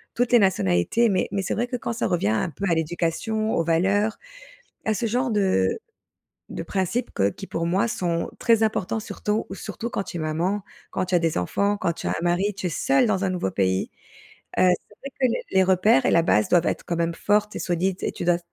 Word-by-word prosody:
toutes 245 0 +1
les 240 - +7
nationalités, 190 - +2
mais 185 -2 +1
mais 195 - -1
c'est - - -1
vrai 240 +2 -1
que 250 - -4
quand 235 -1 -3
ça 235 - -1
revient 170 - +1
un 110 - 0
peu 165 +6 -5
à 170 - +3
l'éducation, 175 +7 -1
aux 165 - +2
valeurs, 195 +6 +1 0.7
à 220 - +1
ce 230 +2 -1
genre 245 +3 0
de 190 - +1 0.7
de - - -5
principes 195 +7 -1
que 100 - +2
qui 195 - -7
pour 165 -2 -2
moi 185 +6 +2
sont 170 -6 -2
très 225 -2 +4
importants 220 -1 -1
surtout 210 0 -2
surtout 235 +1 -6
quand 200 - -2
tu 185 - -8
es - - -3
maman, 170 +6 -1 0.3
quand - - -1
tu 185 0 -3
as - - +6
des 165 -2 0
enfants, 200 - 0
quand 170 -4 0
tu - - -7
as - - -1
un - - -2
mari, 185 +4 +1
tu 195 -1 -4
es - - -1
seule 265 - +2
dans 200 -3 0
un 190 - +1
nouveau 180 - -1
pays. 95 -1 0 0.7
Heu, - - +5
c'est 180 +3 -1
vrai 275 - -7
que 260 - +5
les 235 - -1
les 190 - +5
repères 185 -5 +4
et - - +3
la 170 - +5
base 105 -10 +2
doivent 175 -2 +3
être - - -1
quand 170 - -2
même 170 0 0
fortes 210 +3 +1
et - - -4
solides 180 +2 -1
et - - -1
tu - - -5
dois 175 0 +3
190 Hz, 235 wpm, -24 LUFS, 170-215 Hz, 0.7 s, les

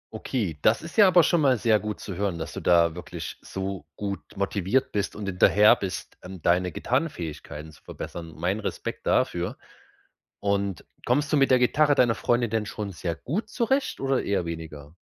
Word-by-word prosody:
Okay, 95 - -3
das 110 +8 +3
ist 165 - -9
ja 205 -3 +7
aber 180 -2 +6
schon 165 0 +3
mal 130 -4 +4
sehr 110 -1 +3
gut 105 -1 -5
zu 95 - -6
hören, 95 -2 -2
dass 80 - -6
du - - -5
da 85 -2 +4
wirklich 90 - -7
so 95 -4 -5
gut 100 -1 -4 0.2
motiviert 100 +5 0
bist 100 -1 -2
und 105 -1 -6
hinterher 100 +3 +5
bist, 95 -2 -6
ähm, 95 0 -9
deine 90 +1 +2
Gitarrenfähigkeiten 80 - -3
zu - - -19
verbessern. 85 -1 -8
Mein 95 +5 -1
Respekt - - -5
dafür. - - +1 0.8
Und 100 -2 -1 0.2
kommst 145 +5 +1
du - - +6
mit 135 -2 +3
der 130 - +6
Gitarre 145 +4 +4
deiner 120 -4 +3
Freundin 120 -2 +1
denn 110 -2 0
schon 100 -2 -5
sehr 85 0 -3
gut 180 - -3
zurecht 265 +3 0
oder 135 -1 0
eher 100 -4 0
weniger? 80 -2 -7
100 Hz, 185 wpm, -26 LUFS, 90-130 Hz, 0.8 s, ja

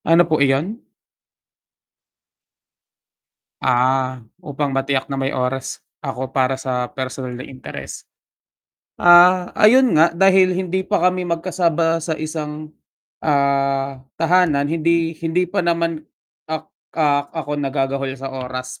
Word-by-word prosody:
Ano 165 +1 +7
po 155 -2 +2
iyon? 150 - 0 2.8
Ah. 130 +1 +1 0.2
Upang 145 -2 -3
matiyak 135 0 0
na 135 - -4
may 135 0 0
oras 130 0 -3 0.2
ako 130 +1 -5
para 130 0 +1
sa 125 -2 -3
personal 130 -1 -5
na 130 - -7
interes. 130 -1 -9 0.9
Ah, 180 +1 +6
ayun 250 +3 +5
nga, 160 +2 +5
dahil 185 0 +4
hindi 185 0 -1
pa 205 - +1
kami 180 -1 -4
magkasama 165 -1 0
sa 160 0 -3
isang, 155 -1 -6 0.5
ah, 140 -2 0 0.2
tahanan, 165 -3 +2
hindi 165 0 +1
hindi 170 +2 0
pa 195 +3 -2
naman 170 -2 0 0.5
ak 160 0 -3 0.3
ah, 145 -2 +1 0.2
ako 145 +1 -3
nagagahol 135 -1 -2
sa 135 0 -6
oras 130 -1 -6
150 Hz, 120 wpm, -20 LUFS, 135-170 Hz, 2.8 s, Ano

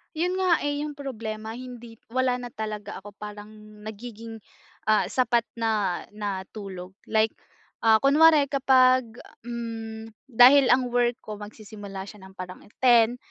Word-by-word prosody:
'Yon 355 +4 0
nga 365 -3 +2
eh, 290 +1 -2
yung 300 - -5
problema, 225 -5 -6
hindi 240 -2 -10 0.2
wala 255 -1 +1
na 245 -1 -8
talaga 210 -2 -6
ako, 205 0 -13
parang 210 0 -9 0.3
nagiging, 225 +1 -8 0.5
ah, 215 0 +2
sapat 240 -2 +2 0.2
na 215 -5 -1
na 200 -3 -4
tulog. 190 -3 -8 0.2
Like, 220 0 +2 0.5
ah, 220 -1 +6
kunware 295 +3 +5
kapag, 255 -3 +4 0.3
hmm, 225 -2 -6 0.2
dahil 255 +3 +7
ang 250 -1 +2
work 240 0 +2
ko 210 -4 -9
magsisimula 205 -2 -9
siya 205 0 -12
ng 190 - -21
parang 185 0 -8 0.2
10:00, 240 -1 +4
225 Hz, 140 wpm, -25 LUFS, 210-255 Hz, 0.5 s, dahil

